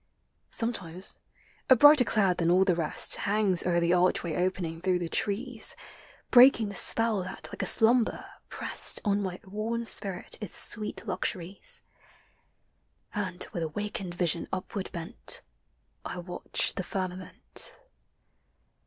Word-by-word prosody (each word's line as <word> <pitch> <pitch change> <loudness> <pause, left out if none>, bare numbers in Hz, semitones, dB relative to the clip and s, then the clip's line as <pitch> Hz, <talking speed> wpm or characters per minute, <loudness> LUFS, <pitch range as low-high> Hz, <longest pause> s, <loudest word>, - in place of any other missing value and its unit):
* - - -47
Sometimes 190 -6 -2 0.5
a 260 - +8
brighter 290 +1 +7
cloud 195 -6 +1
than 170 -1 +1
all 185 +2 +4
the 185 - +3
rest 165 -3 +2
Hangs 200 -3 +2
o'er 175 -1 +2
the 170 +1 +1
archway 180 -2 +1
opening 175 -2 -2
through 185 0 +1
the 175 -1 -4
trees, 220 +7 0 0.6
Breaking 245 -4 +6
the 200 - -8
spell 225 0 +1
that, 185 +1 -8
like - - -6
a - - 0
slumber, 230 +1 +3 0.2
pressed - - +1
On 205 0 +1
my 185 -2 -5
worn 220 +4 -4
spirit 195 -4 -3
its 210 - 0
sweet 210 +1 0
luxuries, 190 - -3 0.6
— - - -41
And 185 -4 -3
with 170 - -3
awakened 180 +2 -4
vision 175 -2 +1
upward 190 +1 -5
bent, 170 +6 -4 0.6
I - - -6
watch 175 0 0
the 185 - -4
firmament. 185 0 -3
190 Hz, 135 wpm, -28 LUFS, 180-215 Hz, 0.6 s, a